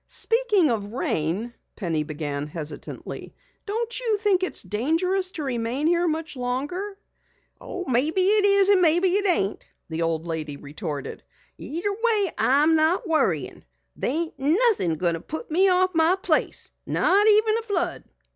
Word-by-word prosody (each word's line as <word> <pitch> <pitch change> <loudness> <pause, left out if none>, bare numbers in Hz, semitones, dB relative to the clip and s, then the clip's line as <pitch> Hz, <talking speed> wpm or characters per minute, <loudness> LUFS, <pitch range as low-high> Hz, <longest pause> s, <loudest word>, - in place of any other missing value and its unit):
"Speaking 430 - +1
of 210 -2 -4
rain," 205 - -2 0.2
Penny 165 -6 -2
began 150 -1 -4
hesitantly, 155 0 -6 0.3
"Don't 465 +4 -3
you 455 -4 0
think 405 -3 +1
it's 370 - -1
dangerous 335 - 0
to 310 - -5
remain 250 +2 -2
here 345 +1 +2
much 315 -1 -3
longer?" 290 +11 -4 0.6
"Maybe 315 0 0
it 410 +2 +4
is, 400 0 +5
maybe 350 +2 +4
it 400 +2 +1
ain't," 210 - 0 0.3
the 160 0 -4
old 165 0 -1
lady 155 -3 -5
retorted. 145 0 -7 0.4
"Either 345 +6 -3
way 430 -4 +1
I'm 295 +5 +3
not 330 +7 +1
worryin'. 190 - -1 0.3
There - - -2
ain't 320 +4 -1
nothin' 315 - +2
going 170 +1 0
to 165 - -5
put 315 - -8
me 380 +5 +6
off 370 0 +3
my 325 +2 +3
place 425 - -1 0.2
not 405 +3 +3
even 435 +1 +4
a - - -6
flood." 355 -6 -2
320 Hz, 145 wpm, -24 LUFS, -, 0.6 s, me